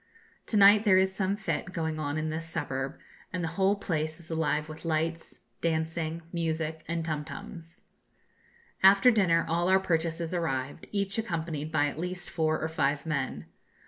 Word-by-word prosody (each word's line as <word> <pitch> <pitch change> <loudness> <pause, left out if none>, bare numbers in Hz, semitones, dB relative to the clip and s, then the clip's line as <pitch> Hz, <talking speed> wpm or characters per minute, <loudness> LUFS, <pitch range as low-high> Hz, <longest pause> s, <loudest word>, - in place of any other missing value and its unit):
To 215 - +1
night 205 +1 +8
there 195 -4 +5
is 190 0 +3
some 195 +1 0
fête 175 -3 -3
going 160 -2 -2
on 145 0 -2
in 155 0 -1
this 165 +1 -4
suburb, 135 -4 -3 0.3
and 180 -1 -3
the 165 - -1
whole 190 +4 +2
place 155 -5 -2
is 170 0 -8
alive 155 -1 0
with 155 0 -10
lights, 165 0 -2 0.2
dancing, 160 0 -1
music, 160 -1 -2
and 165 0 -2
tum 155 -2 -2
tums. 165 -1 -9 1.0
After 195 +5 +7
dinner 180 -7 +3
all 170 +2 +1
our 190 0 +6
purchases 165 -2 -1
arrived, 145 -4 -2
each 200 +1 -1
accompanied 160 -7 -3
by 150 -2 +3
at 145 +1 -3
least 180 +1 -4
four 155 -2 +1
or 160 - -1
five 145 -2 0
men. 135 - -2
165 Hz, 170 wpm, -29 LUFS, 155-180 Hz, 1.0 s, night